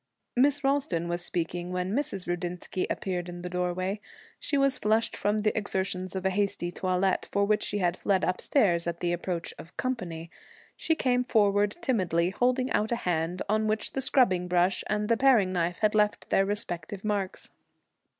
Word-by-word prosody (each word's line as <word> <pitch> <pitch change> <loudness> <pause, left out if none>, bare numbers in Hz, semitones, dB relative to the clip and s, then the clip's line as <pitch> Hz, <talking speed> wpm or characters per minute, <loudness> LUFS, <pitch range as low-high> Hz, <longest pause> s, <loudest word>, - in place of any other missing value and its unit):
Miss 280 +3 +3
Ralston 270 -12 +1
was 175 0 -2
speaking 175 +1 -3
when 180 +1 -2
Mrs. 230 -8 -2
Rudinsky 175 +1 -3
appeared 180 -2 -3
in 175 0 -8
the 180 - -4
doorway. 180 +3 -1 0.4
She 285 - -1
was 275 -1 +3
flushed 220 +1 +1
from 205 +1 0
the 215 0 +1
exertions 190 -3 -2
of 190 0 -3
a 190 - +3
hasty 195 -3 -1
toilet, 185 +1 0
for 200 0 +2
which 210 +1 +2
she - - -1
had 175 -3 +1
fled 190 -1 +1
upstairs 180 -2 +2
at 170 0 -3
the 175 0 0
approach 175 0 -3
of 165 - -12
'company.' 175 -10 -3 0.4
She 320 - 0
came 250 -4 +1
forward 205 -3 +2
timidly, 185 - +1
holding 255 +4 +1
out 215 +2 +1
a - - +3
hand 175 0 0
on 215 +1 +1
which 215 0 -1
the 270 - -1
scrubbing 190 -10 +3
brush 180 +1 +2
and 210 0 0
the 230 0 +3
paring 230 -9 +4
knife 175 0 0
had 215 -1 +3
left 210 -1 +1
their 195 - +3
respective 195 -2 -4
marks. 200 -3 -2
195 Hz, 180 wpm, -28 LUFS, 175-215 Hz, 0.4 s, paring